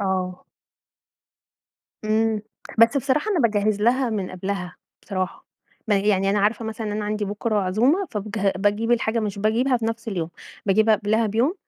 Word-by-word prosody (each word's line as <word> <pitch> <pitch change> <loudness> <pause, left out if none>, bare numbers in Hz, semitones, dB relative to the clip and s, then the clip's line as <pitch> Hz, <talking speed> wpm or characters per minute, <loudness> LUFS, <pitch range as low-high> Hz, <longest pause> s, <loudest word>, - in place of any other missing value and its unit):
آه. 185 -2 -2 1.6
إمم، 215 0 +1 0.4
بس 230 +4 +6
بصراحة 280 +9 +1
أنا 390 - +1
باجهّز 210 -3 +1
لها 250 +2 +2
من 200 -4 -2
قبلها، 185 -1 -4 0.3
بصراحة، 185 -2 -4 0.4
م - - +3
يعني 195 -1 +2
أنا 205 - +2
عارفة 215 +3 +1
مثلًا 220 -1 -4
أنا 210 0 -2
عندي 210 0 -1
بُكرة 210 +2 -2
عزومة 235 - +2
فبج 210 0 -4 0.2
باجيب 205 +4 +1
الحاجة، 230 -1 +1
مش 205 -2 -3
باجيبها 235 +5 +2
في 230 - -4
نَفس 225 0 -3
اليوم، 175 -6 -3 0.4
باجيبها 215 +2 +4
قبلها 215 +3 +1
بيوم 235 - +1
215 Hz, 155 wpm, -23 LUFS, 200-230 Hz, 1.6 s, بس